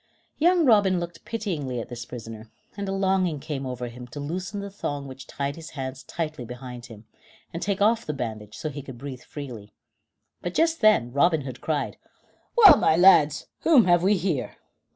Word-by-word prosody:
Young 345 +1 +4
Robin 205 -7 +4
looked 175 0 -7
pityingly 160 - -3
at 115 - -6
this 120 -1 -7
prisoner, 115 -2 -9 0.3
and 200 -1 -4
a - - -1
longing 190 -5 +1
came 140 -2 -5
over 125 -1 -4
him 120 +1 -10
to 145 - -9
loosen 180 +7 -4
the 200 0 -6
thong 145 -7 -4
which 135 0 -10
tied 140 0 -3
his 165 0 -9
hands 130 0 -5
tightly 155 -5 -5
behind 125 0 -9
him, 110 -1 -13 0.5
and 170 - -5
take 200 0 -1
off 225 +2 +3
the - - 0
bandage 110 -6 -6
so 155 - -3
that - - -10
he 145 - -6
could 130 -3 -10
breathe 130 -1 -7
freely, 120 -9 -9 0.7
but 175 0 -5
just 330 0 +2
then 210 - +4
Robin 160 +2 +3
Hood 130 -2 -8
cried: 155 -3 -2 0.6
"Well, 405 -10 +10
my 160 - +3
lads, 155 -5 +5
whom 295 -9 +5
have 175 -1 +4
we 195 +3 +3
here?" 165 -8 -2
150 Hz, 195 wpm, -25 LUFS, 125-190 Hz, 0.7 s, Well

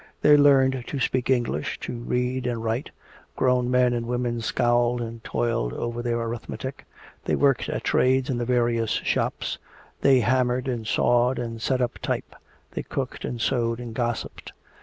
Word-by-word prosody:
They 150 - +7
learned 135 -3 +4
to 140 - -3
speak 130 0 0
English, 120 - 0
to - - -4
read 125 +2 -1
and 115 -2 -2
write; 115 +4 -2 0.5
grown 125 -1 +2
men 125 -1 +3
and 120 -1 -2
women 120 -1 -1
scowled 120 +2 +2
and 115 -1 -6
toiled 115 - -1
over 120 0 -3
their 120 -1 -1
arithmetic. 120 +3 -5 0.4
They - - +1
worked 140 -4 +2
at - - -3
trades 130 +1 +2
in 125 -3 -1
the 120 - -1
various 120 -2 +1
shops; - - -1 0.4
they 135 -2 +5
hammered 125 +2 +1
and 120 -4 -3
sawed 120 +3 +2
and 115 -2 -4
set 130 +2 0
up 120 - -3
type; - - -3 0.4
they - - -3
cooked - - -4
and 120 - -4
sewed 115 -1 0
and 120 -2 -7
gossiped. 120 -1 -3
120 Hz, 165 wpm, -25 LUFS, 115-130 Hz, 0.5 s, They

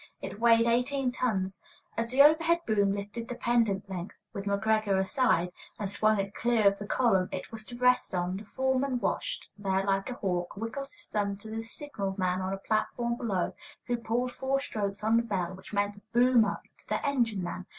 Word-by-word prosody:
It 205 - -7
weighed 230 0 +5
eighteen 250 +3 +1
tons. 195 -7 -1 0.3
As 230 0 -1
the 265 +3 +7
overhead 330 +3 +5
boom 205 -3 +2
lifted 205 +3 -5
the 245 - -4
pendent 225 -5 +1
length 185 -1 -6 0.2
(with 200 - -5
McGreggor 205 0 +2
astride) 190 -3 +2 0.3
and 205 - -2
swung 215 +1 +2
it 195 +1 -2
clear 235 0 +1
of 200 0 +3
the 205 - -6
column 195 -8 +2
it 185 - -5
was 220 -1 -6
to 240 - -9
rest 250 -5 +3
on, 180 +1 -1
the 205 - -8
foreman, 265 +3 0
watching - - -2
there 195 -1 +1
like 195 +1 0
a 250 - -4
hawk, 180 -3 -2
wiggled 230 +6 -4
his 340 +3 -9
thumb 200 -5 -1
to 220 +2 -10
the 225 0 -3
signal 225 -5 -5
man 185 -1 0
on 185 0 -2
a 195 - -2
platform 230 +4 -1
below, 205 -7 -1 0.3
who 245 - 0
pulled 240 +2 -1
four 265 +2 0
strokes 205 -6 -3
on 220 +1 +4
the - - +4
bell, 190 -6 -2
which 190 0 -12
meant 205 0 -1
"boom 240 -1 +5
up" 205 - -3 0.2
to - - -22
the - - -1
engine 235 -9 +1
man. 180 +1 -5
215 Hz, 200 wpm, -29 LUFS, 195-245 Hz, 0.3 s, the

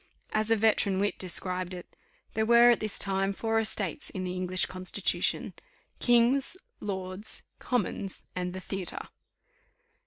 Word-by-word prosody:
As 215 0 +1
a 225 - +5
veteran 210 -3 +2
wit 205 +1 0
described 185 0 -1
it, 175 - -11 0.4
"There 220 - +1
were 235 +2 +7
at 235 - +2
this 215 -1 -3
time 195 0 +1
four 225 +2 0
estates 210 -5 -2
in 185 - -5
the 180 0 -3
English 185 0 0
Constitution, 185 -1 -1 0.5
kings, 245 +7 +3 0.2
lords, 190 +1 0 0.2
commons, 205 -5 -2
and 180 0 -2
the 185 - -5
theatre." 190 -1 -4
195 Hz, 135 wpm, -29 LUFS, 185-225 Hz, 0.5 s, were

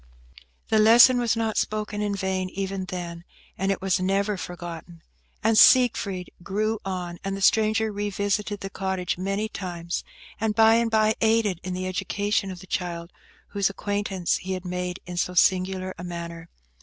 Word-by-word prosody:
The 220 - +3
lesson 235 +3 +7
was 235 -2 +1
not 225 -1 -1
spoken 210 -1 -2
in 205 -1 -1
vain 190 -1 -2
even 195 0 -4
then, 170 -2 -6 0.3
and 195 +1 0
it 195 - -3
was 190 -1 +2
never 195 +2 0
forgotten. 170 -2 -8 0.4
And 225 +1 +3
Siegfried 200 -7 +4
grew 215 +4 -1
on, 180 -2 -4
and 195 0 -3
the - - -6
stranger 215 +1 +3
revisited 205 0 -2
the 195 - -6
cottage 190 -3 -2
many 195 +3 -1
times, 175 -4 -5 0.4
and 220 -1 0
by 225 +1 +6
and 235 0 +1
by 220 -1 +3
aided 220 -5 +2
in 185 0 -4
the 185 0 -3
education 200 +2 -1
of 180 -1 -8
the - - -11
child 175 -2 -4 0.4
whose 200 -2 +1
acquaintance 200 -2 -1
he 190 +1 -4
had 185 0 -5
made 180 0 -3
in 180 0 -7
so 180 +1 -1
singular 185 +1 +2
a - - -6
manner. 170 -1 -7
195 Hz, 170 wpm, -25 LUFS, 180-210 Hz, 0.4 s, lesson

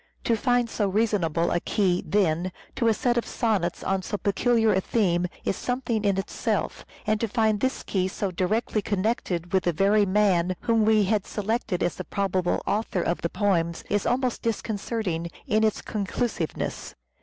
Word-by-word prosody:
To 230 - +2
find 245 +1 +2
so 210 -2 -1
reasonable 185 -6 +1
a 175 - +2
key, 185 -1 +1
then, 180 -2 +1 0.2
to 230 - +1
a 225 - +5
set 240 +1 +1
of - - -5
sonnets 205 -8 -1
on 195 0 0
so 205 - -3
peculiar 225 +2 +2
a 190 - +2
theme 180 -5 +1 0.2
is - - +1
something 245 -2 -2
in 200 -2 +2
itself; 195 - -2 0.2
and 215 -1 +1
to 230 - +1
find 220 -1 +1
this 260 +4 -1
key 185 -2 0
so 190 +1 -3
directly 210 +5 0
connected 190 -4 -1
with 190 - +2
the 175 - +2
very 200 +4 +3
man 185 -3 +2
whom 225 -2 +2
we 215 -1 +4
had 205 0 0
selected 210 -3 -1
as 175 - -1
the - - -4
probable 190 -3 -1
author 205 -4 0
of 170 - -1
the 170 - -1
poems 170 -5 0
is 205 -1 +1
almost 250 0 0
disconcerting 210 -6 -2 0.2
in 215 +1 +2
its 215 -1 +1
conclusive 205 -3 -2
ness. - - -4
205 Hz, 180 wpm, -26 LUFS, 185-225 Hz, 0.2 s, a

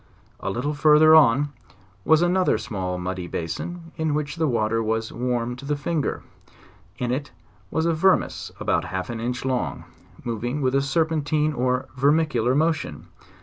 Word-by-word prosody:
A - - -3
little 125 +9 -2
further 155 +1 +6
on 145 -2 +5 0.6
was 160 +1 +5
another 180 -5 +2
small 95 -4 -4
muddy 90 0 -4
basin, 165 - -5
in 160 -2 0
which 150 +1 -3
the 160 -1 +1
water 115 -2 +1
was 110 0 -2
warm 125 0 -1
to 135 - -11
the. 145 +1 -1
finger: 150 +1 -2 0.7
in 125 -1 -2
it 140 +3 -2 0.4
was 160 +8 0
a 170 - +2
vermes 185 +4 +1
about - - 0
half 95 +4 -4
an 115 - -5
inch 125 +3 -3
long, 120 - -2 0.4
moving 120 +4 -3
with 130 0 +1
a 135 - +3
serpentine 155 0 0
or 125 -1 0
vermicular 135 -3 +2
motion. 155 - -1
135 Hz, 155 wpm, -24 LUFS, 115-155 Hz, 0.7 s, further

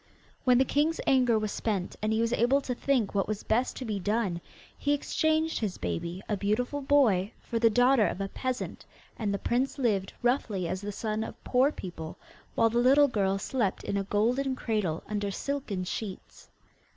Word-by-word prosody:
When 250 -1 +5
the 265 - +4
king's 300 +5 +1
anger 250 -4 +4
was 215 -1 -2
spent, 200 -5 -2
and 215 +1 0
he 220 +1 +2
was 230 +1 +1
able 245 +4 +3
to 255 - -3
think 245 -4 0
what 195 -2 +1
was 215 -1 -3
best 240 +4 +1
to 260 - -5
be 210 -3 -2
done, 195 -3 -1 0.3
he 290 - 0
exchanged 315 +2 +1
his 210 -5 -2
baby, 170 - -4
a 210 - 0
beautiful 240 +8 -1
boy, 235 -9 +3
for 230 - -3
the 230 0 +5
daughter 245 0 +4
of - - -4
a 195 - -1
peasant, 255 +5 -4 0.3
and 210 -3 -2
the 200 - 0
prince 255 +7 0
lived 205 -8 0
roughly 225 -7 +1
as 185 +2 -3
the 205 0 -4
son 215 +1 -2
of - - -9
poor 260 +3 +3
people, 170 - -7 0.4
while 225 - +3
the 235 - +2
little 275 +4 +5
girl 195 -4 +1
slept 205 0 -1
in - - -2
a 200 - 0
golden 250 +7 +1
cradle, 210 -10 -1
under 205 -1 -2
silken 225 -4 -3
sheets. 190 +1 -7
225 Hz, 190 wpm, -29 LUFS, 200-255 Hz, 0.4 s, When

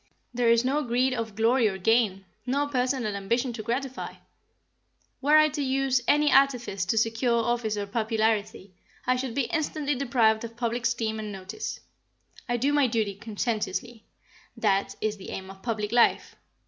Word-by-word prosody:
There 240 -1 +2
is 230 +1 +4
no 280 +4 +1
greed 255 0 +1
of 225 -4 -4
glory 230 +2 +3
or 190 -2 -2
gain; 195 -1 +2 0.2
no 280 +3 +1
personal 255 -5 -1
ambition 235 +6 -1
to 225 - -5
gratify. 255 +4 -4 1.1
Were 295 +3 +5
I 310 0 +6
to 295 0 -4
use 265 -1 +1
any 295 0 +4
artifice 250 -8 +2
to 225 - 0
secure 225 +2 +2
office 235 -3 -1
or 205 - -2
popularity, 215 -2 -1 0.3
I 255 - +3
should 255 -2 -4
be 280 - +1
instantly 305 0 -1
deprived 235 -5 +2
of 230 0 -8
public 240 0 -2
esteem 225 -2 -2
and 215 -1 -5
notice. 195 +2 -6 0.7
I 240 - +1
do 275 +5 +1
my 290 -2 +4
duty 220 -4 -1
conscientiously; 225 +2 -3 0.5
that 195 -2 +1
is 215 -1 -1
the 190 - -10
aim 190 0 -6
of 190 0 -15
public 215 -2 -2
life. 240 0 +3
235 Hz, 165 wpm, -27 LUFS, 215-260 Hz, 1.1 s, I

